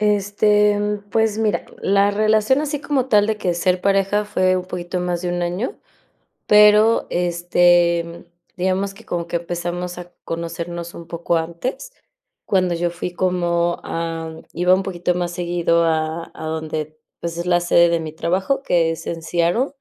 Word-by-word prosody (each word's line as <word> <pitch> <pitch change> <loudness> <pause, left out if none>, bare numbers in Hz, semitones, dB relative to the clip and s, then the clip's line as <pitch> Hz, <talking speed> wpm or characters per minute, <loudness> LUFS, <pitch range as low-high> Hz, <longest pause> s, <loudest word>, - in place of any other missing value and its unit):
Este, 210 0 +3
mm, 205 0 -2
pues 220 -1 +1
mira, 220 -2 0 0.2
la 200 +1 +3
relación 215 +5 +2
así 295 -1 -3
como 275 -4 0
tal 210 -4 +4
de 220 - 0
que 180 -4 -1
ser 180 +1 +1
pareja 195 +2 +1
fue 185 -2 +1
un 180 - -3
poquito 180 0 -4
más 180 0 -2
de 180 - -2
1 175 0 -2
año, 180 - -3 0.7
pero, 210 +2 +6
este, 175 0 +3
mm, 170 0 -10 0.3
digamos 190 +2 0
que 225 - -16
como 170 -3 -3
que 170 - -4
empezamos 175 +1 -4
a 175 0 -10
conocernos 170 +1 -5
un 170 - -9
poco 170 0 -1
antes, 170 - -4 0.5
cuando 185 -3 +1
yo 175 +1 0
fui 175 +1 -5
como, 175 -2 0
am, 165 -1 -4
iba 180 +2 +3
un 190 - +3
poquito 180 -2 -1
más 175 -1 -2
seguido 170 -1 +1
a 160 0 -1
a - - -8
donde, 155 -1 -4 0.2
pues, 170 0 -5
es 170 - -3
la 175 -1 +3
sede 170 0 +4
de 170 0 +1
mi 160 -1 -5
trabajo, 190 - -1
que 170 -2 +2
es 165 - -7
en 165 -1 -4
Seattle. 175 +10 +1
175 Hz, 175 wpm, -20 LUFS, 170-205 Hz, 0.7 s, pero